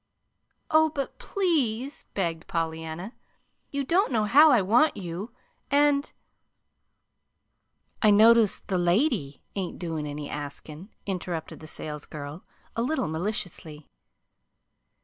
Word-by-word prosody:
"Oh, 315 0 +5
but 285 -3 -5
PLEASE," 285 - 0
begged 165 -4 -2
Pollyanna. 160 +4 -3 0.6
"You 280 0 -2
don't 345 +5 +2
know 220 -3 +2
how 290 +9 +7
I 250 -5 +6
want 230 +11 +3
you, 180 +3 -5 0.4
and 285 0 +3 1.3
" - - -46
"I 215 - +6
notice 220 0 +6
the 185 -3 -1
lady 175 - +1
ain't 190 -3 -4
doin' 160 -4 -4
any 145 0 -5
askin'," 150 +5 -7 0.2
interrupted 180 -4 -4
the 155 - -11
salesgirl, 150 0 -7 0.3
a 230 - 0
little 275 - 0
maliciously. 160 -3 -4
195 Hz, 110 wpm, -27 LUFS, 160-260 Hz, 1.3 s, how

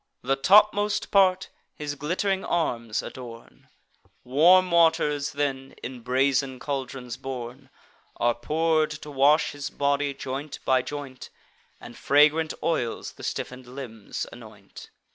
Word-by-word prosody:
The 135 - +1
topmost 205 +6 +4
part 190 -1 +3 0.3
his 145 -1 -4
glitt'ring 190 +6 -1
arms 115 -10 -1
adorn; 120 -2 -11 0.5
Warm 175 +8 +5
waters, 160 -4 +2
then, 135 -2 -3
in 125 0 -6
brazen 130 +1 +1
caldrons 130 -3 -5
borne, 130 0 -7 0.5
Are 120 0 +2
pour'd 155 +5 +1
to 150 - -8
wash 145 +3 +3
his 145 -1 -6
body, 140 0 0
joint 135 +2 -5
by 130 -1 +3
joint, 140 -1 -8 0.5
And - - -11
fragrant 150 +2 +3
oils 130 -9 -1
the - - -14
stiffen'd 125 0 -5
limbs 125 -5 -7
anoint. - - -13
140 Hz, 120 wpm, -25 LUFS, 130-160 Hz, 0.5 s, Warm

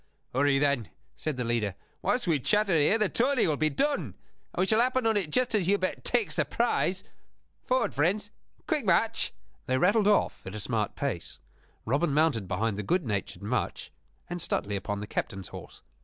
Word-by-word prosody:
"Hurry, 135 +2 +3
then," 140 -5 +1 0.3
said 155 -4 -3
the 125 - -1
leader. 115 -5 -1 0.3
"Whilst 250 - +1
we 165 -5 +2
chatter 210 - +2
here 160 +8 +4
the 215 -2 +2
tourney 255 +5 +2
will 155 - +1
be 155 +1 +1
done; 285 - -1 0.4
and - - -17
we 185 - +3
shall 220 +3 +3
happen 255 0 +1
on 225 -1 +3
it 195 -7 0
just 250 +9 +1
as 200 -5 +2
Hubert 195 -1 0
takes 445 - +1
the - - +3
prize. - - 0 0.6
Forward, 255 +1 +1
friends; 195 +8 0 0.4
quick 305 -4 0
march!" 215 +4 +2 0.4
They 130 - +2
rattled 200 +7 +3
off 210 - +2
at 95 - -6
a - - -4
smart 110 -1 -2
pace. 135 -12 -3 0.5
Robin 140 +5 +1
mounted 150 - +2
behind 100 +3 -1
the - - 0
good 175 - 0
natured 105 -2 -3
Much, 110 +3 -2 0.4
and 175 0 -4
Stuteley 100 -7 -2
upon 100 +1 -3
the - - -4
captain's 95 -2 -4
horse. - - -11
155 Hz, 185 wpm, -28 LUFS, -, 0.6 s, here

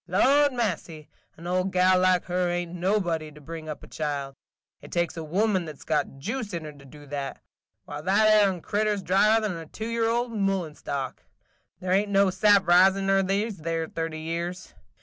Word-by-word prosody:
Lordy 270 +9 +3
massy, 170 -9 -3 0.3
an 165 - -12
old 185 +2 0
gal 185 0 +4
like 185 -1 +3
her 180 0 0
ain't 175 0 -3
nobody 175 -4 -1
to 150 - -14
bring 155 +1 -8
up 150 - -7
a - - -11
child. 140 -3 -4 0.5
It - - -13
takes 175 -1 -1
a 165 - -5
woman 190 +3 0
that 155 -3 -8
's - - -14
got 150 -3 -1
juice 210 - -4
in 165 - -4
her 150 - -7
to 140 -2 -16
do 145 +2 -14
that. 140 -1 -5 0.5
Why, 145 0 -7
that 195 +6 +3
'ere 190 -3 +2
crittur 210 +2 0
's 195 - -7
drier 215 +5 +3
'n 195 -4 -2
a 165 -1 -8
two 220 - -7
year 230 -1 0
old 240 +1 0
mullen 195 -7 -1
stalk. 140 -3 -5 0.6
There 180 0 -3
ain't 200 +2 +2
no 195 -1 +3
sap 200 +1 +4
ris 185 +2 +6
in 195 0 -2
her 195 0 +4
these 195 0 -1
'ere 165 0 -2
thirty 165 -1 -4
years. 170 +3 -4
180 Hz, 205 wpm, -26 LUFS, 160-200 Hz, 0.6 s, ris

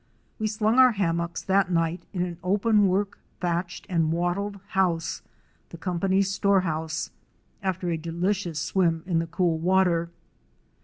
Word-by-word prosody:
We 215 - 0
slung 215 +3 +1
our 255 -2 +7
hammocks 170 -4 -1
that 190 0 +2
night 165 0 0
in 180 -3 -1
an 175 -1 -5
open 205 +2 +3
work, 195 +2 -1 0.2
thatched 175 0 -2
and 165 -5 +1
wattled 180 +4 -1
house, 170 -3 0 0.5
the 170 - -9
company's 190 +2 0
store 200 -1 +3
house, 160 -2 -3 0.5
after 185 -2 -1
a 165 - 0
delicious 170 +1 -2
swim 165 0 +1
in 175 -3 +1
the 165 - -2
cool 165 -1 0
water. 175 -1 +2
180 Hz, 145 wpm, -26 LUFS, 170-195 Hz, 0.5 s, our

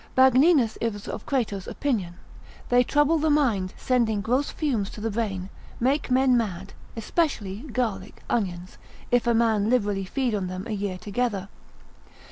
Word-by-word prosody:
Magninus 260 -1 +5
is 205 -3 -3
of 215 - -6
Crato's 220 -9 -1
opinion, 205 -12 -2 0.5
They 245 0 +5
trouble 295 +5 +2
the 315 +1 +1
mind, 235 -11 +1
sending 230 -5 +1
gross 255 +7 0
fumes 240 -11 -1
to - - -10
the 225 +1 -2
brain, 195 -4 -3 0.3
make 270 +5 +1
men 255 0 +4
mad, 195 -5 -2 0.2
especially 225 - -1
garlic, 215 -5 -3
onions, 185 -5 -3 0.3
if 245 -1 +2
a 235 - +3
man 220 -2 +2
liberally 205 -5 +1
feed 250 +4 -1
on 195 -3 -1
them 185 +1 -5
a 235 - -6
year 200 -3 -2
together. 205 -1 -2
225 Hz, 150 wpm, -25 LUFS, 200-255 Hz, 0.5 s, Magninus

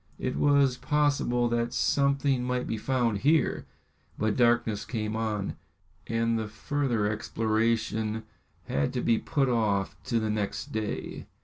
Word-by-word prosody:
It - - -2
was 140 -3 +3
possible 145 -5 +1
that 120 +1 -1
something 140 -2 +2
might 125 0 -1
be - - -2
found 120 -4 0
here, 150 +7 +2 0.5
but 110 -1 0
darkness 120 -3 +2
came 110 -2 -3
on, 110 -3 -2 0.5
and 115 0 +1
the 110 - -3
further 120 +1 -1
exploration 110 0 0 0.4
had 70 0 -1
to 125 - -1
be 115 -1 +2
put 140 -3 0
off 105 -5 +1
to 120 -3 +1
the 110 -1 -1
next 100 -1 -3
day. 110 -1 -4
115 Hz, 135 wpm, -28 LUFS, 110-130 Hz, 0.5 s, was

